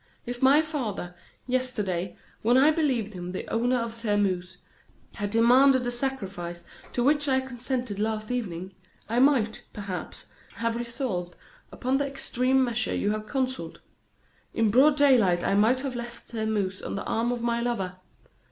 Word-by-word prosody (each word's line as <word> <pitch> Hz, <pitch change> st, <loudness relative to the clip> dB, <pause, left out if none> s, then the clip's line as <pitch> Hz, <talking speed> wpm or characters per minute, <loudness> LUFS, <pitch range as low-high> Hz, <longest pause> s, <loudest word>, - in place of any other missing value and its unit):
If 245 Hz, 0 st, -5 dB
my 280 Hz, +4 st, +6 dB
father, 235 Hz, -, -4 dB, 0.3 s
yesterday, 210 Hz, -9 st, -2 dB, 0.2 s
when 240 Hz, +3 st, +4 dB
I 285 Hz, +4 st, +6 dB
believed 260 Hz, -10 st, 0 dB
him 180 Hz, 0 st, -6 dB
the 185 Hz, -, -5 dB
owner 240 Hz, +3 st, +2 dB
of 230 Hz, -2 st, -2 dB
Sairmeuse, 200 Hz, -5 st, -1 dB, 0.6 s
had 205 Hz, -2 st, -3 dB
demanded 250 Hz, +4 st, +5 dB
the 245 Hz, -, -1 dB
sacrifice 195 Hz, -10 st, -4 dB, 0.3 s
to 245 Hz, -, +1 dB
which 290 Hz, +2 st, +3 dB
I 265 Hz, -1 st, +3 dB
consented 250 Hz, -4 st, -4 dB
last 215 Hz, +1 st, -2 dB
evening, 190 Hz, -6 st, -4 dB, 0.3 s
I 230 Hz, +2 st, +1 dB
might, 250 Hz, -5 st, +3 dB
perhaps, 200 Hz, -3 st, -6 dB, 0.3 s
have 230 Hz, 0 st, -1 dB
resolved 235 Hz, -7 st, -3 dB, 0.4 s
upon 260 Hz, +2 st, 0 dB
the 280 Hz, 0 st, 0 dB
extreme 265 Hz, -1 st, +1 dB
measure 240 Hz, -2 st, -1 dB
you 205 Hz, -, 0 dB
have 215 Hz, 0 st, -4 dB
counselled. 260 Hz, +1 st, -2 dB, 0.8 s
In 225 Hz, -2 st, +3 dB
broad 285 Hz, +6 st, +5 dB
daylight 230 Hz, -12 st, +4 dB
I -, -, +1 dB
might 225 Hz, +6 st, +3 dB
have 265 Hz, -2 st, -4 dB
left 235 Hz, 0 st, -7 dB
Sairmeuse 215 Hz, -4 st, -2 dB
on -, -, -4 dB
the 200 Hz, -, -3 dB
arm 230 Hz, +2 st, 0 dB
of 240 Hz, -1 st, -3 dB
my 235 Hz, 0 st, 0 dB
lover. 195 Hz, -7 st, -2 dB
235 Hz, 155 wpm, -27 LUFS, 205-260 Hz, 0.8 s, my